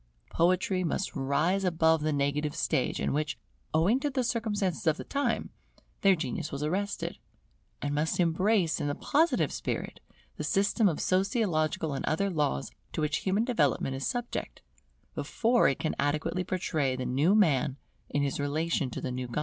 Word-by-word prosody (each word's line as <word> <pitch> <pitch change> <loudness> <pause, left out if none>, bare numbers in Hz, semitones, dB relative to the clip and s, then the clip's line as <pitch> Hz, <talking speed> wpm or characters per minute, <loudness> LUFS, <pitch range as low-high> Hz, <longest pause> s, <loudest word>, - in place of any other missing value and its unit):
Poetry 185 +2 +2
must 180 +3 -2
rise 150 +8 +1
above 160 -3 +3
the 155 +1 0
negative 145 +1 0
stage 130 - 0
in - - 0
which, 155 +2 -1 0.3
owing 180 +11 +3
to 290 - -1
the 260 -2 -1
circumstances 210 -8 -1
of 160 0 +3
the - - -6
time, 285 0 -1 0.5
their 195 -1 +6
genius 170 0 -4
was 140 +1 -4
arrested, 195 +6 -2 0.6
and 145 0 -1
must 150 +4 0
embrace 175 +1 +2
in - - -1
the 145 - -1
Positive 320 +4 +2
spirit - - -4 0.4
the - - -3
system 200 +1 +2
of 155 - -3
sociological 185 - +1
and 135 - -3
other 195 +5 0
laws 145 - -1 0.2
to - - -2
which 150 0 +1
human 200 +3 +1
development 145 - +1
is 135 - -2
subject, 245 -1 -4 0.5
before 240 +1 +2
it 135 - +1
can 155 - -1
adequately 150 +5 0
portray 160 -7 -1
the 130 0 -4
new 150 +10 +3
Man 145 -9 +3 0.3
in 145 - 0
his 140 0 -1
relation 145 0 0
to - - -6
the 130 - -3
new 125 0 -3
God. 120 +5 -3
160 Hz, 170 wpm, -29 LUFS, 145-195 Hz, 0.6 s, their